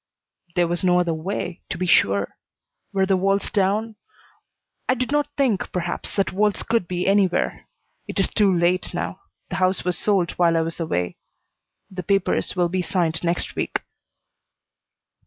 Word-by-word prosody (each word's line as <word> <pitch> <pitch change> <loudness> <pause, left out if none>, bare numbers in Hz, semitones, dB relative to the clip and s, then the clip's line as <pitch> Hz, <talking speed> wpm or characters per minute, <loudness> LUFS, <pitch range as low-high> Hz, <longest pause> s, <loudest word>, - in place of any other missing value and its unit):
"There 175 -1 +3
was 175 +2 -2
no 180 -1 +4
other 175 -2 +1
way 175 +1 -4
to - - -3
be 185 - -1
sure. 100 - +3 0.6
Were 195 -1 +2
the 190 0 +3
walls 195 +1 +1
down 210 +2 0 0.9
I 255 - +4
did 255 +1 -2
not 295 0 +2
think, 250 -9 +1
perhaps, 175 -1 -3
that 195 -2 +1
walls 210 +1 +1
could 225 -6 0
be 180 0 -2
anywhere. 195 -2 +1 0.4
It - - -3
is - - +1
too 205 -3 +3
late 175 +1 +1
now. - - -3 0.3
The - - -2
house 185 0 +1
was 180 -3 0
sold 195 -5 +2
while 170 -1 +4
I - - +3
was 165 +1 -4
away. 90 - -2 0.7
The 185 -1 -4
papers 195 +1 +1
will 175 -1 +2
be 185 +2 -1
signed 170 -3 -1
next 170 0 -1
week." - - -2
185 Hz, 165 wpm, -23 LUFS, 175-200 Hz, 0.9 s, no